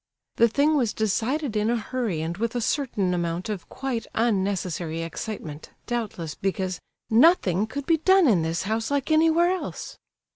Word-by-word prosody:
The 235 - +6
thing 285 +7 +2
was 245 -7 +1
decided 225 +5 -1
in 210 +1 +1
a 240 - +2
hurry 225 -7 -2
and 165 +2 -3
with 230 +4 -2
a - - +1
certain 220 -8 0
amount 175 +3 -2
of 205 -5 -5
quite 260 -4 -4
unnecessary 190 -7 -1
excitement, 165 -2 -6 0.2
doubtless 210 -10 -3
because 185 -2 -2 0.3
"nothing 220 - +4
could 280 +5 -5
be 330 +1 +3
done 375 +2 +4
in 200 -9 +4
this 160 +1 -1
house 220 +3 -1
like 285 +1 -1
anywhere 325 +2 +4
else." 370 - -5
220 Hz, 160 wpm, -25 LUFS, 185-270 Hz, 0.3 s, The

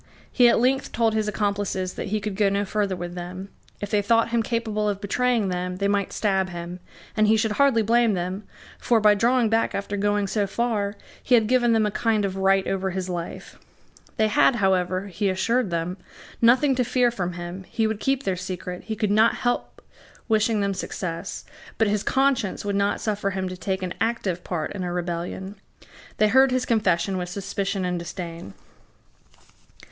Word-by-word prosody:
He 245 -2 +5
at - - +3
length 265 +3 +1
told 225 -2 +2
his 215 -1 0
accomplices 200 -3 -1
that - - -5
he 215 +2 -1
could 210 -1 -4
go 205 0 +3
no 200 +1 0
further 200 -1 -1
with 175 0 -6
them. 180 +2 -7 0.3
If 205 0 -5
they 210 -2 +3
thought 230 +2 +2
him 235 -1 +2
capable 220 -2 -1
of 200 -1 -2
betraying 230 0 +1
them, 180 0 -3
they 200 +2 0
might 200 -1 0
stab 190 -3 0
him; 175 0 -7 0.4
and 215 -1 +3
he 220 +1 +4
should 220 0 +1
hardly 270 -6 +4
blame 230 -1 +3
them; 185 +3 -3 0.4
for, 235 -2 +2
by 210 -1 +6
drawing 235 +3 +2
back 225 +1 +1
after 200 +1 -3
going 205 0 +1
so 200 +1 0
far, 210 -2 -1 0.3
he 250 - +4
had 225 -2 +4
given 240 0 +3
them 220 -1 +3
a 210 - 0
kind 215 -1 +1
of 190 -1 -3
right 195 0 +3
over 190 0 -1
his 185 0 -4
life. 175 -1 -6 0.6
They 220 - +3
had, 215 +4 +4
however, 185 -2 +1
he 200 +1 -1
assured 220 +4 +1
them, 170 +2 -2 0.4
nothing 255 +4 +5
to 250 - +3
fear 250 0 +2
from 180 -6 -3
him: 175 +2 -7
he 225 - 0
would 220 -1 -1
keep 270 +2 0
their 190 - 0
secret; 180 -1 -6
he 220 - -3
could 210 -2 0
not 220 +2 +4
help 245 0 -2 0.4
wishing 220 -1 +2
them 200 0 0
success; 180 -1 -5 0.3
but 225 - +3
his 205 0 +1
conscience 265 -8 +1
would 200 -1 -1
not 200 0 +1
suffer 205 -2 -1
him 190 -1 -3
to 185 - -6
take 190 0 -3
an 180 - -3
active 205 -6 -1
part 165 -4 -3
in 195 -2 -4
a 175 - -3
rebellion. 175 +3 -4 0.6
They 215 - +4
heard 265 +3 +5
his 255 0 0
confession 190 -4 +1
with 180 0 -4
suspicion 195 0 -3
and 180 -1 -1
disdain. 170 - -7
205 Hz, 195 wpm, -24 LUFS, 185-225 Hz, 0.6 s, by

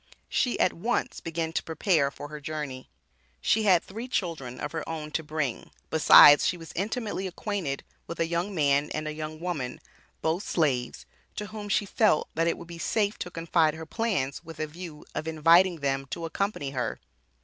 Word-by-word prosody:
She 250 - +1
at - - +3
once 230 +8 -1
began 165 0 -3
to - - 0
prepare 160 -3 +1
for 145 +1 -9
her 150 0 -7
journey. 145 -3 -5 0.5
She 220 - +2
had 185 -4 +5
three 225 +6 -7
children 160 - -3
of 150 - -4
her 160 -1 -3
own 155 -2 -5
to 160 - -1
bring, 150 -5 -3 0.2
besides 145 -1 +9
she 180 - 0
was 165 -1 -10
intimately 205 0 -2
acquainted 185 -6 -3 0.2
with 170 - -7
a 165 - +3
young 170 +4 -2
man 145 -2 +2
and 155 0 -3
a 155 - -3
young 155 0 -6
woman, 155 -8 -3 0.4
both 160 +3 +1
slaves, 135 - -1 0.3
to 210 - -4
whom 210 -1 -6
she 205 - +2
felt 205 -5 +2
that 165 +1 +1
it 170 - +1
would - - -10
be 170 -1 -9
safe 210 +3 0
to 180 - -4
confide 165 -2 +1
her 160 0 -7
plans 170 - -1
with 165 -2 -10
a 155 - 0
view 160 0 -9
of 155 - -4
inviting 165 +2 +4
them 135 -1 -1
to 165 +5 -5
accompany 165 -5 -2
her. 125 -3 -2
165 Hz, 190 wpm, -27 LUFS, 150-185 Hz, 0.5 s, besides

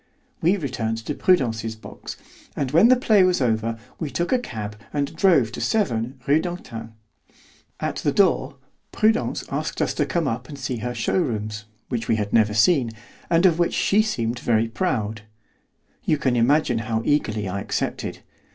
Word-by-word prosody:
We 180 +5 +3
returned 120 - -2
to - - -2
Prudence's 115 - +1
box, 110 - -9 0.4
and 135 -3 -2
when 170 +9 +6
the 255 - +7
play 215 -5 +4
was 180 -1 +3
over 115 -2 0 0.2
we 160 - -3
took 175 +4 -2
a 255 - +3
cab 105 - -6 0.2
and 145 +1 -2
drove 160 - +4
to - - -6
7, 130 - 0
Rue 145 +3 +4
d'Antin. 120 -11 -6 0.9
At - - -2
the - - 0
door, - - +2 0.4
Prudence 220 +1 +1
asked - - -3
us - - +1
to - - 0
come 170 -4 0
up 125 0 -3
and 145 - -8
see 130 -2 -3
her 120 +2 -4
showrooms, 110 - -1 0.2
which 120 -3 -3
we - - +3
had 105 -1 -3
never 105 -2 +3
seen, 125 +2 +4 0.4
and 170 +2 +3
of 175 -2 +4
which 170 - +1
she 205 +2 +3
seemed 120 - -2
very 115 -2 +2
proud. 110 - -2 0.8
You 155 - +2
can 130 -4 +1
imagine 120 0 +3
how 110 0 -2
eagerly 110 -8 0
I 100 +2 -3
accepted. - - -3
125 Hz, 170 wpm, -23 LUFS, 110-170 Hz, 0.9 s, the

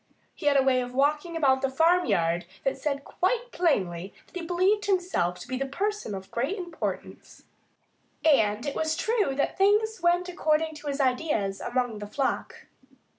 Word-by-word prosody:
He - - -4
had 285 -1 +5
a 270 - +5
way 260 -1 +3
of 245 0 -6
walking 300 +5 +1
about 265 -4 +3
the 270 - +1
farmyard 265 - +2 0.2
that 270 - 0
said 280 0 -3
quite 485 +11 -1
plainly 190 - 0
that - - -23
he 360 - -4
believed 370 +5 +1
himself 355 - 0
to 175 - -10
be 255 0 -3
a - - +1
person 395 - -2
of 190 0 -9
great 270 - -1
importance. 350 -4 -6 0.8
And 220 -7 +3
it 285 - -2
was 315 0 0
true 435 - +1
that 280 +6 -1
things 420 +2 +3
went 350 +1 +2
according 315 -3 0
to 295 - -10
his 280 0 -2
ideas, 250 -7 0
among 245 -3 -1
the 210 - -6
flock. 270 +6 -3
290 Hz, 175 wpm, -27 LUFS, 250-355 Hz, 0.8 s, had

